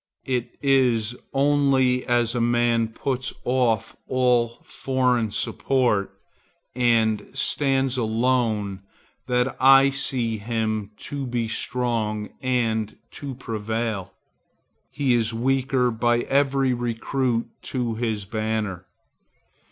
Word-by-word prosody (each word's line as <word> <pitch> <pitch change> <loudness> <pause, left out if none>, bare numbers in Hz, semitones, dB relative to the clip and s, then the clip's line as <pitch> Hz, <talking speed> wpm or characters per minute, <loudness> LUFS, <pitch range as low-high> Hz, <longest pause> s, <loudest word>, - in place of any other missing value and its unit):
It 125 -2 -2
is 125 -5 +2 0.2
only 135 -2 +3
as 120 -2 +2
a 120 - -1
man 120 -1 +2
puts 125 +2 -3
off 120 -4 +1
all 125 -2 +2
foreign 125 -4 0
support 120 -2 0 0.6
and 115 -3 +2
stands 135 -2 +1
alone 110 -4 0 0.5
that 125 +1 +1
I 135 +1 +7
see 120 -5 -1
him 110 -1 -2 0.2
to 140 -2 -3
be 120 -2 -1
strong 110 -3 -1
and 115 -4 0
to 140 -2 -7
prevail. 110 -4 -3 0.7
He 140 -4 +1
is 115 -1 +1
weaker 130 0 +1
by 120 +1 +1
every 135 -1 +2
recruit 120 0 -1 0.2
to 120 -3 -2
his 110 -3 -2
banner. 110 -3 -3
120 Hz, 100 wpm, -24 LUFS, 110-130 Hz, 0.7 s, I